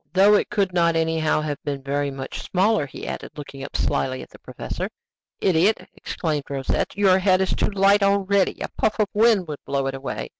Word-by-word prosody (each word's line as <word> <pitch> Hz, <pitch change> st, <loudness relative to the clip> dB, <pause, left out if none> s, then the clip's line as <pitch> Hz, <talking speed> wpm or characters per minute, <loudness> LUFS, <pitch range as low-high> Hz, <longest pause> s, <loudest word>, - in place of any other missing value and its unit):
"Though 195 Hz, +3 st, +6 dB
it 205 Hz, -, +2 dB
could 195 Hz, -3 st, 0 dB
not 170 Hz, -1 st, +3 dB
anyhow 160 Hz, -1 st, +1 dB
have 150 Hz, -2 st, -4 dB
been 140 Hz, -2 st, -4 dB
very 140 Hz, +1 st, -1 dB
much 135 Hz, -1 st, -6 dB
smaller," 190 Hz, -4 st, +1 dB
he -, -, -9 dB
added, -, -, -7 dB
looking 140 Hz, -2 st, -8 dB
slyly 130 Hz, -1 st, -1 dB
at -, -, -15 dB
the -, -, -15 dB
professor. -, -, -5 dB, 0.5 s
"Idiot!" 190 Hz, +4 st, +2 dB
exclaimed 150 Hz, -5 st, -3 dB
Rosette. 135 Hz, +6 st, -2 dB
"Your 190 Hz, -2 st, +4 dB
head 185 Hz, -1 st, +3 dB
is 190 Hz, -, 0 dB
too -, -, 0 dB
light 200 Hz, 0 st, +4 dB
already; 200 Hz, -1 st, +2 dB
a -, -, -3 dB
puff 215 Hz, -, +2 dB
of 210 Hz, -1 st, +2 dB
wind 215 Hz, -4 st, +3 dB
would 150 Hz, -2 st, -6 dB
blow 140 Hz, -1 st, -1 dB
it 135 Hz, -, -2 dB
away." 135 Hz, 0 st, -5 dB
170 Hz, 195 wpm, -23 LUFS, 145-200 Hz, 0.5 s, Though